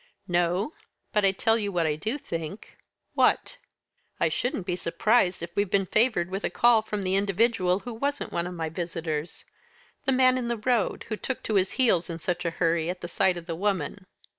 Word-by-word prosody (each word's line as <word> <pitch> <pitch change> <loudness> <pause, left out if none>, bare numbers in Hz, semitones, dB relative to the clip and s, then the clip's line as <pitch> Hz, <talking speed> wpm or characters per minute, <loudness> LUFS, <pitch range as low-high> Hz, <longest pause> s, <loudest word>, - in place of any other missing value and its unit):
"No; 175 - +1 0.4
but 210 - +3
I 195 - +5
tell 225 +4 +2
you 205 -2 -2
what 175 -3 +1
I 150 -1 +1
do 220 - -2
think." 180 - -6 0.4
"What?" - - +2 0.6
"I - - +3
shouldn't 240 -7 -2
be 180 - -1
surprised 185 +1 +1
if 170 0 -7
we've 200 -1 +1
been 195 0 +2
favoured 215 -4 +2
with 195 +2 -3
a - - 0
call 235 -2 +4
from 210 -2 -4
the 185 0 0
individual 195 -1 +2
who 245 - -6
wasn't 280 +5 -3
one 170 0 -1
of 180 - -6
my 165 -1 -2
visitors; 165 -2 -4 0.6
the 270 - +2
man 255 0 +4
in 240 - -3
the 235 0 -1
road, 225 -1 0
who 220 - -1
took 260 +4 -4
to 220 - -2
his 190 -2 +2
heels 205 -10 +2
in 165 - -4
such 175 +1 -3
a - - +2
hurry 165 -1 +1
at 180 0 -4
the - - -4
sight 180 +1 +2
of 170 - -8
the 170 - -4
woman." 190 0 -2
190 Hz, 210 wpm, -27 LUFS, 175-225 Hz, 0.6 s, I